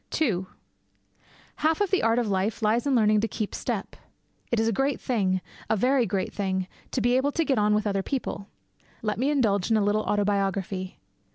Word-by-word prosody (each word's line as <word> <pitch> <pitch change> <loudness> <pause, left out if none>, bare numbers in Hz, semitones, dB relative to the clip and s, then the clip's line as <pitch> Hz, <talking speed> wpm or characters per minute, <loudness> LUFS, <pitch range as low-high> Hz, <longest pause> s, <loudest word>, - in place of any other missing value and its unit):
II 190 - +1 1.1
Half 315 +1 +2
the 385 - +3
art 225 +1 +2
of 240 -2 +1
life 200 +3 -1
lies 225 +5 +2
in 275 - +3
learning 215 -2 +4
to 225 - 0
keep 215 -2 -4
step. - - -3 0.6
It 235 - +2
is 225 - +2
a - - +2
great 270 +5 0
thing 190 -7 0 0.3
a - - +3
very 250 +3 +2
great 190 0 -2
thing 190 -2 -1 0.2
to 255 - -1
be 245 +2 +3
able 280 +2 +1
to 330 - +1
get 270 -6 +2
on 210 0 +3
with 210 - 0
other 195 -2 0
people. 200 -4 -4 0.6
Let 210 -1 -1
me 265 +3 +2
indulge 220 -10 +1
in 225 - +4
a 210 - +2
little 205 +1 +2
autobiography. 195 -2 -1
215 Hz, 195 wpm, -26 LUFS, 200-245 Hz, 1.1 s, learning